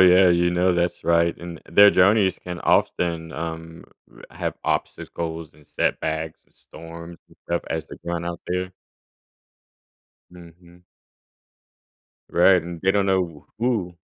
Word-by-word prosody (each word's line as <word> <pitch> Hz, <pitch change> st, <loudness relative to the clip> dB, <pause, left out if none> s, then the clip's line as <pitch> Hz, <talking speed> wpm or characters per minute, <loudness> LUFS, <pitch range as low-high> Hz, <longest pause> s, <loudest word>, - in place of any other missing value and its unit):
yeah, 90 Hz, 0 st, +7 dB
you 85 Hz, 0 st, +3 dB
know, 90 Hz, +1 st, +2 dB
that's 85 Hz, 0 st, -1 dB
right. 85 Hz, 0 st, +2 dB
And 85 Hz, -2 st, -8 dB
and -, -, -16 dB
their 100 Hz, 0 st, +9 dB
journeys 100 Hz, +1 st, +3 dB
can 90 Hz, -1 st, -7 dB
often, 80 Hz, -2 st, 0 dB
um, 80 Hz, 0 st, -6 dB, 0.3 s
r -, -, -15 dB
have -, -, -4 dB
obstacles 80 Hz, -1 st, -3 dB
and 75 Hz, -1 st, -21 dB
setbacks 80 Hz, 0 st, -2 dB
and -, -, -35 dB
storms 85 Hz, +1 st, -12 dB
and -, -, -22 dB
stuff 85 Hz, 0 st, -2 dB
as 80 Hz, -1 st, -3 dB
they -, -, -10 dB
run 85 Hz, 0 st, -3 dB
out 85 Hz, 0 st, -5 dB
there. 90 Hz, +1 st, -2 dB, 1.6 s
Mhm. 85 Hz, 0 st, -16 dB, 1.5 s
Right. 90 Hz, 0 st, +5 dB
And 85 Hz, 0 st, -8 dB
they 95 Hz, -, +2 dB
don't 100 Hz, 0 st, +1 dB
know 90 Hz, -6 st, -1 dB
who 110 Hz, -7 st, -1 dB
85 Hz, 140 wpm, -23 LUFS, 85-90 Hz, 1.6 s, their